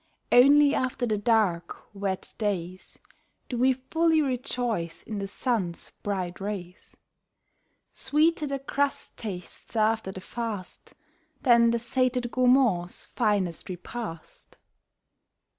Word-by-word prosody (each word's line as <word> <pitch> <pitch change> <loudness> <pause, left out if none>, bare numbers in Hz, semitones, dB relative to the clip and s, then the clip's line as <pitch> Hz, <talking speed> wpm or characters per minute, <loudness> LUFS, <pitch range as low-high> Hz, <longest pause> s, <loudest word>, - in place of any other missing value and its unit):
Only 285 +3 +7
after 255 -2 0
the 215 -3 0
dark, 205 -5 0
wet 195 -2 -3
days 185 -4 -3 0.5
Do 245 - -3
we 260 +1 +5
fully 320 +5 +1
rejoice 245 - -2
in 215 -2 -5
the 195 - -3
sun's 195 -5 -2
bright 185 -3 -3
rays. 190 -3 -6 1.0
Sweeter 305 +3 +2
the 275 0 -2
crust 280 +1 -2
tastes 195 +1 -8
after 220 -2 +1
the 190 - -8
fast 210 -2 -6 0.5
Than 235 -2 +6
the 235 - +2
sated 250 +1 0
gourmand's 250 -9 +3
finest 195 -6 -1
repast. 180 -2 -8
225 Hz, 110 wpm, -27 LUFS, 190-255 Hz, 1.0 s, Only